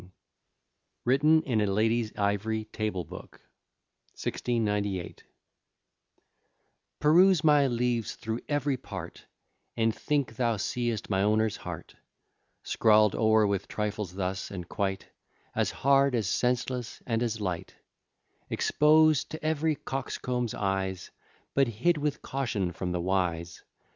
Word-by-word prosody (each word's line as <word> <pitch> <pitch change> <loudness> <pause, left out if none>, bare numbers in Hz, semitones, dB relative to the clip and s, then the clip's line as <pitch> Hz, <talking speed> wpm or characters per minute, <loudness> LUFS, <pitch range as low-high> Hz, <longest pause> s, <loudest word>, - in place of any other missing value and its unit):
] - - -52
WRITTEN 150 +5 +4
IN 115 -5 0
A 105 - +1
LADY'S 110 +3 +1
IVORY 105 +2 0
TABLE 105 -5 -2
BOOK, - - -11 0.8
1698 105 -6 -2 1.8
Peruse 175 +2 +5
my 150 -3 +5
leaves 120 -2 -1
thro' 110 +1 -4
ev'ry 145 -2 0
part, 95 -8 -9 0.5
And 115 -1 +2
think 140 -5 -1
thou 115 -3 +1
seest 115 +1 -2
my 95 0 +2
owner's 110 +1 +2
heart, - - -8 0.7
Scrawl'd 105 -2 +4
o'er 110 -1 +4
with 100 -1 -1
trifles 105 -3 -3
thus, 95 0 -3
and 90 -3 -7
quite 95 -2 -2 0.5
As - - +1
hard, 140 -1 +3
as 110 -5 0
senseless, 125 +2 -1
and 115 -2 0
as 115 -2 -1
light; 90 -5 -4 0.7
Expos'd 155 -1 +4
to 155 0 -7
ev'ry 155 0 +1
coxcomb's 125 -3 -3
eyes, 95 -2 -2 0.4
But 135 -1 +3
hid 150 +9 +1
with 145 -1 -2
caution 115 -9 -2
from 90 +1 -4
the 90 -1 -1
wise. 85 -2 -1
110 Hz, 120 wpm, -28 LUFS, 100-135 Hz, 1.8 s, Peruse